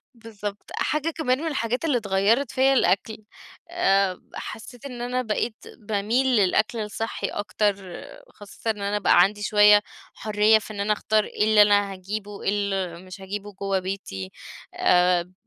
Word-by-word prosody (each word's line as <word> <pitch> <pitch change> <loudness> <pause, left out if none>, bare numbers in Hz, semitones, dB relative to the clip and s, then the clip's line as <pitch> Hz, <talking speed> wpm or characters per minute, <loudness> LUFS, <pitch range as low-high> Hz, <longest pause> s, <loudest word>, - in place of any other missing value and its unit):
بالضبط، 210 -3 -8
حاجة 305 +1 0
كمان 300 -6 0
من 325 - -3
الحاجات 250 -2 -2
اللي 290 -6 +2
اتغيرت 215 +5 +1
فيا 265 +1 +3
الأكل، 215 -3 +1 0.5
آآ، 195 - +1
حسّيت 235 +3 -8
إن 250 -3 -7
أنا 250 +1 -1
بقيت 220 -1 -2 0.2
باميل 215 +4 0
للأكل 215 -1 +2
الصحّي 220 +1 -3
أكتر، 205 0 -1 0.5
خاصةً 205 +2 -8
إن 210 -2 -8
أنا 200 +1 -1
بقى 175 - +5
عندي 205 +3 +1
شويّة 210 0 +6 0.3
حريّة 215 0 +3
في 215 0 -10
إن 205 - -8
أنا 205 +1 +1
أختار 215 0 +1
إيه - - -2
اللي 215 0 +5
أنا 205 -1 +4
هاجيبه، 200 +2 -6
إيه - - +1
اللي 195 -4 -2
مش 185 +1 -11
هاجيبه 205 +2 -6
جوّه 195 0 -1
بيتي، 185 - -6 0.4
آآ، 180 0 +2
210 Hz, 155 wpm, -24 LUFS, 195-225 Hz, 0.5 s, شويّة